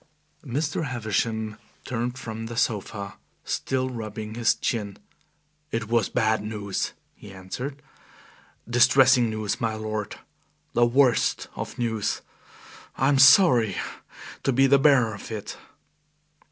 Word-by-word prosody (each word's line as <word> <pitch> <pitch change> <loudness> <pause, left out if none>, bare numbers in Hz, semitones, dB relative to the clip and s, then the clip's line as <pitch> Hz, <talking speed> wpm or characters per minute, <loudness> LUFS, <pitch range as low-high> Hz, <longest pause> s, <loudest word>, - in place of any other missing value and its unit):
Mr. 150 +4 -2
Havisham 110 -3 -2 0.3
turned 125 +1 -3
from 115 -2 -6
the 115 0 -7
sofa, 100 -3 -2 0.3
still 130 -1 -1
rubbing 110 -2 -6
his 115 0 +2
chin. 105 -4 -3 0.7
"It 115 -2 -3
was 115 -3 +2
bad 110 -3 +1
news," 105 -2 -3 0.2
he 105 - -13
answered, 125 +10 -7 0.8
"distressing 120 0 +5
news, 110 -1 -3
my 110 -1 0
lord 110 -1 -4 0.6
the 120 0 +4
worst 130 0 +2
of - - -6
news. 115 -4 -2 0.7
I 135 - +2
am 140 -2 +3
sorry 135 - +6 0.7
to 135 - +1
be 135 +2 +4
the 140 +1 +5
bearer 135 -6 +4
of 100 - -9
it." 105 -2 -5
115 Hz, 120 wpm, -25 LUFS, 110-130 Hz, 0.8 s, sorry